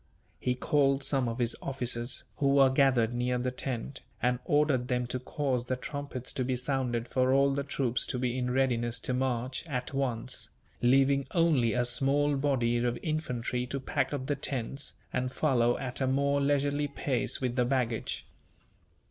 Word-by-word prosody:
He 125 - 0
called 140 +1 +2
some 135 -3 +1
of 115 - -4
his 120 -2 0
officers, 125 -2 -1
who 140 -1 +2
were 135 -1 +6
gathered 130 -4 +3
near 125 +1 0
the 125 +1 -1
tent, 130 +1 -3 0.2
and 125 0 +1
ordered 145 -4 +2
them 125 -1 0
to 125 +1 -2
cause 130 -1 -2
the 130 - -1
trumpets 140 -1 -5
to 130 - -1
be 130 +1 0
sounded 125 -2 -1
for 130 +1 +2
all 140 +1 +4
the 140 - 0
troops 130 -3 0
to - - -2
be 125 -1 -1
in 125 -1 -1
readiness 120 -2 +1
to 125 - -1
march, 125 0 -1
at 130 -3 -3
once; 130 -3 -1 0.3
leaving 135 +2 +4
only 155 -9 +3
a 125 0 +1
small 140 +3 +2
body 130 -4 +1
of 120 0 0
infantry 125 -6 -2
to 140 - -3
pack 135 0 -1
up 140 -3 -3
the 145 +1 0
tents, 135 0 -4 0.2
and 125 0 -1
follow 120 -5 +2
at 130 0 -4
a 130 - +2
more 140 +2 +2
leisurely 145 +1 +1
pace 140 -3 -1
with 125 -2 -1
the 125 - +3
baggage. 120 -3 -1
130 Hz, 175 wpm, -30 LUFS, 125-140 Hz, 0.3 s, were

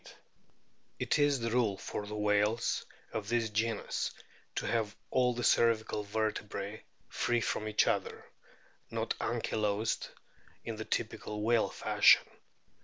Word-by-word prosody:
It - - +1
is 145 -2 +3
the 115 0 -1
rule 115 -5 +2
for 105 - -5
the 105 - -5
whales 105 +2 +1 0.3
of 105 -1 -3
this 115 -2 +1
genus 110 0 -1 0.5
to - - -2
have 110 -3 0 0.2
all 125 -1 +3
the 120 - -3
cervical 115 -2 +3
vertebrae 105 -1 -3 0.2
free 120 0 0
from 110 -1 -1
each 105 0 +3
other, - - -1 0.6
not - - -1
ankylosed 105 0 -1 0.6
in 115 -1 -4
the 110 - -5
typical 105 -2 -3
whale 115 0 +3
fashion. - - +5
110 Hz, 125 wpm, -32 LUFS, 105-115 Hz, 0.6 s, fashion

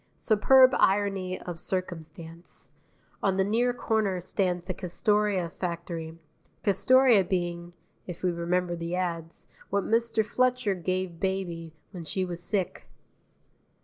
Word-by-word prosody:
Superb 255 +4 +5
irony 195 -2 +1
of 175 -2 -7
circumstance: 170 -2 -6 0.5
on 190 -1 +1
the 190 - +4
near 230 +5 +2
corner 220 -6 0
stands 180 -1 -1
the 185 - -3
Castoria 195 +1 0
factory, 170 -2 -5 0.5
Castoria 245 +1 +5
being 175 -1 -3 0.3
(if 175 -1 -8
we 180 - +2
remember 175 +1 -1
the 170 +1 -4
ads) 170 -3 -4 0.2
what 200 0 0
Mr. 225 -1 +1
Fletcher 250 -2 +1
gave 185 -1 -3
baby 170 -4 -3 0.2
when 180 -4 -7
she 185 +4 -2
was 175 -1 -5
sick. 190 0 -3
185 Hz, 120 wpm, -27 LUFS, 170-205 Hz, 0.5 s, Superb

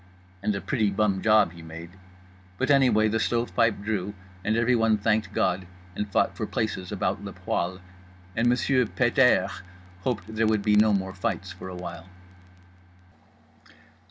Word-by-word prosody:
And 105 0 0
a 100 - -3
pretty 110 -6 0
bum 100 -1 +1
job 110 -5 +4
he 85 -1 -12
made. 85 +1 -9 0.7
But 130 +2 +1
anyway 125 -6 +4
the 110 +1 0
stove 120 +1 -1
pipe 115 -3 +2
drew; 105 -1 -2 0.3
and 110 +3 +1
everyone 115 -2 +3
thanked 110 +1 0
God 90 0 0 0.3
and 105 0 -4
fought - - +1
for - - -3
places 100 -5 -3
about - - -2
le - - -7
poêle. 90 +1 -3 0.5
And 115 +1 +2
Monsieur 125 0 +2
Pet 120 +3 0
airs 100 -7 +3 0.4
hoped 105 0 -2
there 110 0 0
would 110 -2 +1
be 105 0 +3
no 105 +1 +5
more 95 -2 -1
fights 90 0 -3
for 90 0 -9
a 90 - -7
while. 85 -1 -8
105 Hz, 160 wpm, -26 LUFS, 95-115 Hz, 0.7 s, no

